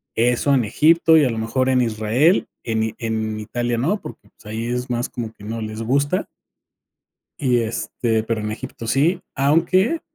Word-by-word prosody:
Eso 125 +4 +2
en 125 -4 +2
Egipto 160 +8 +4
y 155 - +5
a 130 - +2
lo 115 - -3
mejor 115 +4 0
en 130 -1 +3
Israel, 115 - +2 0.2
en 110 -1 -1
en 110 -2 -2
Italia 120 +2 -2
no, 170 - 0
porque, - - -11
pues, - - -25
ahí 110 +2 -4
es 125 +1 -3
más 120 0 -1
como 115 -3 -6
que 105 - -17
no 110 +2 -4
les 110 +1 -5
gusta 140 - +1 1.1
y 125 -4 +2
este, 115 0 -1
pero 110 -1 -2
en 105 0 -3
Egipto 115 +1 -7
sí. 145 +10 +2
Aunque, 170 - +2
120 Hz, 175 wpm, -21 LUFS, 110-140 Hz, 1.1 s, y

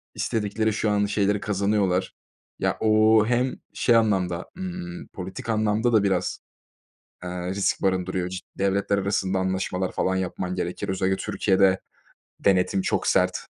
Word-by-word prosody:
istedikleri 110 0 -1
şu 105 0 0
an 105 0 +2
şeyleri 100 0 +1
kazanıyorlar. 100 -2 0 0.5
Ya, - - 0
ooo, 110 0 +5
hem 125 +2 +1 0.2
şey 120 - +3
anlamda, 95 -6 +1
ımm, 180 -1 -6
politik 95 +4 -7
anlamda 110 +2 +1
da 110 - +5
biraz, 95 -3 0 0.9
eee, 90 0 -4
risk 100 +1 0
barındırıyor. 95 -1 0
Ci 95 0 -5 0.2
devletler 100 +1 +1
arasında 95 -1 0
anlaşmalar 95 0 -1
falan 95 0 0
yapman 90 0 -3
gerekir. 90 -1 -3
Özellikle 95 0 0
Türkiye'de 95 -1 +2 0.7
denetim 95 0 +3
çok - - -1
sert. - - +3
100 Hz, 135 wpm, -25 LUFS, 95-110 Hz, 0.9 s, ooo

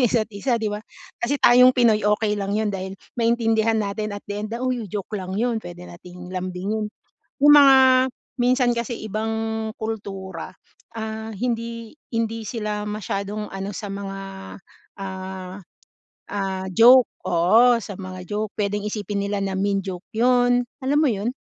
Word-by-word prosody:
isa't-isa, 230 0 +1
'di 210 -2 -1
ba? 210 - -4 0.4
Kasi 260 +5 0
tayong 250 +1 +7
Pinoy, 230 -4 +4
okey 210 0 +2
lang 200 +1 -1
'yon, 215 -2 0
dahil 190 0 -5 0.2
maintindihan 225 -1 +2
natin 210 0 -2
at - - -10
the 205 0 -3
end 215 - -4
na, 240 +2 -3
"Uy, 250 -3 -1
oh, - - -10
joke 200 +2 -5
lang 185 +1 -5
'yon." 230 0 0
Pwede 175 -1 -9
nating 180 +1 -11
lambingin. 185 +4 -3 0.5
Yung 290 +1 +8
mga 275 -2 +8 0.6
minsan 250 0 +3
kasi 235 0 -3
ibang 220 +1 -2
kultura, 200 -4 -5 0.4
ah, 220 0 -5
hindi 230 0 -3 0.2
hindi 225 0 -1
sila 210 -3 -3
masyadong 210 0 -4
ano 195 +1 -4
sa 205 - -5
mga, 195 -1 -5 0.8
ah 190 0 -6 0.7
ah, 195 -2 -3
joke 245 +3 +8 0.2
oo, 220 +8 +5
sa 200 - -7
mga 185 -1 -8
joke. 210 0 -2
Pwedeng 205 0 -1
isipin 205 -1 -3
nila 200 0 -1
na 195 -1 -2
mean 200 0 +1
joke 185 -1 -6
'yon, 245 +1 +3 0.2
alam 275 +3 +1
mo 300 - +4
yun? 210 +1 -1
215 Hz, 155 wpm, -23 LUFS, 195-230 Hz, 0.8 s, Yung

